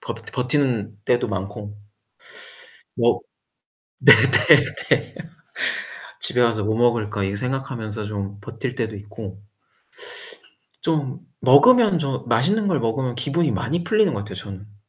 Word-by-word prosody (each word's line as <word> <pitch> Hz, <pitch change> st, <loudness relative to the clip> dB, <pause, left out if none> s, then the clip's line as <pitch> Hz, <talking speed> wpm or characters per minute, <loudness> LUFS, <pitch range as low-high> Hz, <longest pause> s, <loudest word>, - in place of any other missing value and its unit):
버 -, -, -5 dB
버티는 125 Hz, -6 st, -1 dB
때도 120 Hz, -1 st, +1 dB
많고 100 Hz, +2 st, -6 dB, 1.2 s
뭐 -, -, +2 dB, 0.8 s
네네네. -, -, +4 dB, 1.1 s
'집에 125 Hz, -, 0 dB
와서 115 Hz, -3 st, +2 dB
뭐 110 Hz, +1 st, 0 dB
먹을까.' 115 Hz, -3 st, +1 dB
이 100 Hz, +1 st, -2 dB
생각하면서 120 Hz, -3 st, -4 dB
좀 100 Hz, -1 st, -5 dB
버틸 120 Hz, +5 st, -6 dB
때도 110 Hz, -4 st, -3 dB
있고 100 Hz, -1 st, -9 dB, 1.4 s
좀 150 Hz, -5 st, -1 dB, 0.2 s
먹으면 205 Hz, -, +6 dB
저 140 Hz, -4 st, -3 dB
맛있는 185 Hz, -, +2 dB
걸 160 Hz, -7 st, +1 dB
먹으면 120 Hz, +2 st, -1 dB
기분이 145 Hz, +5 st, 0 dB
많이 170 Hz, +3 st, -2 dB
풀리는 215 Hz, -3 st, +2 dB
것 -, -, -3 dB
같아요 100 Hz, -1 st, -7 dB
저는. 100 Hz, +2 st, -9 dB
120 Hz, 240 characters per minute, -22 LUFS, 105-140 Hz, 1.4 s, 먹으면